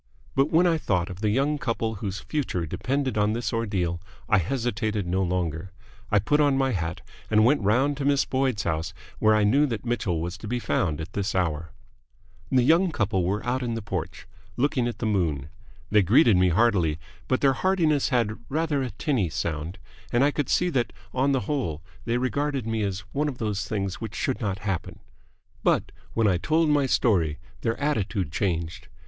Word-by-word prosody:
But 135 +2 +2
when 170 +3 +4
I 165 -2 +3
thought 90 - 0
of 90 +2 -9
the 105 - +2
young 140 +6 +1
couple 115 -3 -2
whose 100 -1 -3
future 130 - -2
depended 130 - -1
on 105 +1 +2
this 115 -2 -2
ordeal, 95 -7 -1 0.3
I 105 - +4
hesitated 110 0 -1
no 90 +2 0
longer. 90 -1 -2 0.4
I 105 - +3
put 145 +9 +2
on 145 -2 +4
my 135 -1 +2
hat 85 -4 -3 0.3
and 110 0 +4
went 140 +2 +4
round 130 +8 +2
to 140 - -2
Miss 140 -1 +3
Boyd's 130 -4 0
house, 80 -1 -2 0.2
where 110 0 +4
I 105 - +3
knew 140 +8 +4
that 115 -2 -4
Mitchell 110 -8 -1
was 85 +3 -4
to 110 - -7
be 125 +3 -1
found 85 -9 0
at 85 +5 -8
this 100 0 -2
hour. 80 -4 -1 0.8
The 130 -1 +4
young 165 +6 +4
couple 100 - 0
were 100 +4 -1
out 125 +2 0
in 120 -2 -2
the 115 - -3
porch, 90 -4 -4 0.3
looking 130 -2 +1
at 120 - -4
the - - -3
moon. 80 -9 0 0.4
They 105 -1 +6
greeted 110 - +5
me 90 0 +4
heartily, 90 -5 +2 0.3
but 130 - +1
their 135 -1 +4
heartiness 160 -4 +2
had 115 -5 0
rather 155 -1 0
a 130 - -2
tinny 110 - -1
sound, 80 +3 -3 0.3
and 120 +2 +3
I 145 - +4
could 145 -2 -2
see 180 0 +2
that 125 -5 0 0.2
on 135 +2 +2
the 135 -2 +1
whole 120 - -2 0.2
they 115 +1 +1
regarded 135 0 -1
me 110 -1 -1
as 100 -2 -2
one 150 +2 0
of 130 - -7
those 105 -3 -2
things 100 -2 -3
which 110 -2 -5
should 130 - -1
not 100 -3 -1
happen. 95 -4 -3 0.6
But - - +1 0.2
when 115 -2 +3
I 95 -3 +3
told 155 - +2
my 145 -2 +3
story 90 - +2 0.2
their 115 - -1
attitude 105 - -1
changed. 85 +1 -2
110 Hz, 195 wpm, -26 LUFS, 95-135 Hz, 0.8 s, They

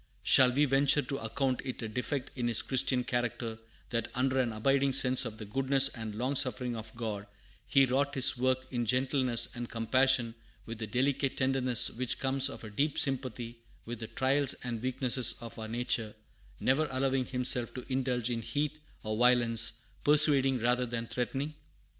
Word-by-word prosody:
Shall 130 -1 +6
we 145 +4 +2
venture 140 +1 +2
to 140 -2 -5
account 130 +3 -2
it 130 -2 -6
a - - -3
defect 125 +4 -4
in 120 -2 -2
his 115 -2 +5
Christian 130 -1 +1
character, 120 -3 -3 0.3
that, 115 -1 -1
under 130 +1 0
an 120 -3 0
abiding 135 +5 +1
sense 130 -1 +2
of 110 - -7
the 110 - -8
goodness 135 +4 +2
and 110 -4 -7
long 130 +5 -2
suffering 125 -2 0
of 110 -1 -8
God, 105 -3 -5 0.4
he 135 -1 +4
wrought 140 +3 -1
his 130 -1 +3
work 130 +1 0
in 120 -2 -2
gentleness 130 0 +1
and 120 -1 -6
compassion, 120 +1 +1 0.3
with 115 -1 -8
the 110 - -4
delicate 135 +4 -1
tenderness 130 -2 +2
which 125 +1 -3
comes 135 +1 +2
of - - -9
a 110 - -9
deep 140 +7 -1
sympathy 125 -3 -2 0.3
with 120 0 -6
the 110 - -6
trials 135 +3 +1
and 120 -3 -4
weaknesses 130 -1 +1
of 115 -1 -10
our 110 - -6
nature, 115 -2 -1 0.4
never 150 +4 +1
allowing 130 0 -1
himself 125 -2 0
to 125 - -7
indulge 125 -2 -1
in 115 -1 -3
heat 150 +5 -3 0.2
or 110 0 -3
violence, 120 -1 +3 0.2
persuading 145 -3 +6
rather 125 +1 +1
than 115 0 -4
threatening? 135 +5 -4
125 Hz, 175 wpm, -30 LUFS, 115-135 Hz, 0.4 s, Shall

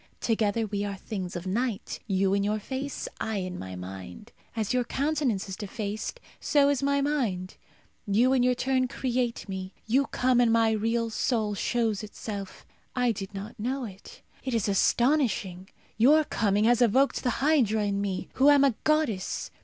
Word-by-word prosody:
Together 225 -1 +1
we 205 -1 -2
are 200 -1 -3
things 185 -3 -5
of 175 +1 -5
night 220 +2 -2
you 195 -1 +2
in 200 0 +2
your 210 +1 0
face, 265 +6 -4
I 220 - -2
in 185 -2 -4
my 95 0 -7
mind. 95 - -9 0.2
As 220 -1 -1
your 250 -1 +2
countenance 275 -6 -1
is 190 - -5
defaced, 215 - -5 0.2
so 285 -1 +3
is 285 -2 +1
my 280 0 +2
mind. 230 -11 -1 0.5
You, 235 +6 +3
in 260 - +3
your 250 0 +3
turn, 255 0 +1
create 245 -2 -2
me. 190 -1 -6
You 265 +5 +2
come, 250 -1 +2
and 235 -2 +4
my 225 -1 +4
real 230 +1 0
soul 220 -2 0
shows 225 0 0
itself. 205 -2 -7 0.3
I 250 -2 +2
did 200 -1 -6
not 210 +4 -7
know 255 +4 -2
it. 195 -2 -12 0.2
It 260 -3 -2
is 220 -3 +1
astonishing. 205 - +1 0.3
Your 290 +8 +6
coming 205 -7 +1
has 240 +2 +4
evoked 255 +4 +3
the 250 - 0
hydra 255 -8 +2
in 200 0 -1
me, 195 -2 -3
who 275 +2 +5
am 285 -1 +6
a 275 -3 +4
goddess. 305 -12 0
225 Hz, 175 wpm, -27 LUFS, 200-255 Hz, 0.5 s, Your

